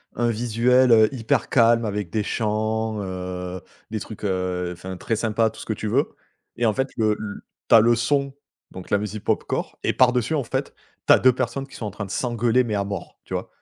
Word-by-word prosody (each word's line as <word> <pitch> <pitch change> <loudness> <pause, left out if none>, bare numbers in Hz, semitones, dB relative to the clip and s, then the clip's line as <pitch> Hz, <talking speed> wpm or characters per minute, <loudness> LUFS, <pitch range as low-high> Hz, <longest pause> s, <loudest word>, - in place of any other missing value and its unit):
un 120 0 +1
visuel, 120 +3 +3
heu, 110 -2 +6
hyper 115 -4 0
calme 115 -1 +4
avec 105 -3 -3
des 110 - -1
champs, 110 0 -1
heu, 90 -1 -5 0.3
des 110 - -2
trucs, 110 - -9
heu, 90 -2 -1
enfin 90 +1 -8
très 115 - -2
sympa, 110 0 +1
tout 110 - -14
ce - - -8
que - - -3
tu 110 - -5
veux 130 +7 +1 0.4
et 120 - +1
en 110 - +3
fait, 130 +4 -1
le 110 -2 +2 0.5
ta 115 - +9
leçon, 120 +5 +2 0.4
donc 90 -1 -10
la 100 - +3
musique 105 0 -5
popcore - - -2
et - - +1
par 130 -1 +5
dessus, 125 +5 0
en 145 - 0
fait, - - -3 0.3
tu - - +8
as - - +7
2 130 - +6
personnes 130 +2 -2
qui - - -14
sont 110 - -5
en 105 - -4
train 100 - -6
de 95 - -9
s'engueuler, 120 +1 +1
mais 110 -3 -2
à 100 - 0
mort, 100 -2 -6
tu - - -9
vois - - -2
110 Hz, 220 wpm, -23 LUFS, 100-120 Hz, 0.5 s, ta